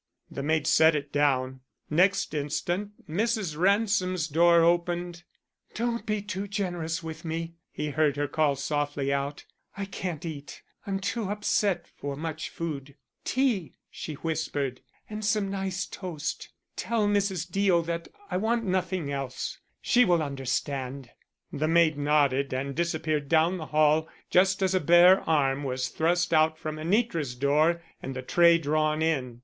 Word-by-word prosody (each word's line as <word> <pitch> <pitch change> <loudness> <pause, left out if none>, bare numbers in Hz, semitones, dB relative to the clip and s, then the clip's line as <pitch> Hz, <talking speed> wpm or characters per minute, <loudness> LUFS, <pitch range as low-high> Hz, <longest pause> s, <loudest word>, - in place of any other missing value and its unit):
The - - -5
maid 155 +1 +1
set 160 0 +5
it 145 -1 -4
down. 130 -3 +1 0.3
Next 185 +3 +2
instant 175 +7 -3
Mrs. 205 -1 -1
Ransom's 185 -2 +2
door 170 +2 +5
opened. 175 0 0 0.5
"Don't 235 -1 -2
be 210 -1 -1
too 200 0 -4
generous 175 -4 -3
with 160 0 -7
me," 165 0 -4 0.2
he 150 0 -3
heard 150 -1 +1
her 145 0 0
call 145 -1 +1
softly 145 0 -1
out. 140 +1 -3 0.3
"I 200 - -3
can't 180 -4 -5
eat. 145 -4 -8 0.2
I'm 195 -1 -1
too 205 +1 -2
upset 205 -2 0
for 140 -1 -4
much 160 +1 -5
food. 145 -4 -6 0.3
Tea," 250 - 0 0.2
she 155 - -6
whispered, 145 -4 -3 0.3
"and 215 0 -6
some 205 -1 +1
nice 190 -1 -2
toast. 175 -6 -5 0.3
Tell 225 -3 0
Mrs. 195 -4 0
Deo 185 -1 +2
that 170 0 -4 0.2
I 180 - +1
want 230 +4 0
nothing 185 -5 -1
else. 135 -2 -4 0.2
She 250 0 +5
will 175 -7 +3
understand." 135 -1 -3 0.4
The 155 +2 0
maid 165 -1 +4
nodded 140 -2 +2
and 140 +1 -3
disappeared 155 -3 -1
down 165 +3 +3
the 155 -3 -6
hall 155 +1 +3 0.2
just 190 +2 +3
as 190 0 +2
a 185 - +3
bare 175 +3 +6
arm 140 -3 +2
was 130 -1 -2
thrust 175 +2 +1
out 155 0 +4
from 155 -1 -5
Anitra's 165 - 0
door 155 +6 +2 0.2
and 135 0 -6
the 130 - -5
tray 170 +4 +5
drawn 155 0 0
in. 130 -7 -1
165 Hz, 150 wpm, -27 LUFS, 145-185 Hz, 0.5 s, bare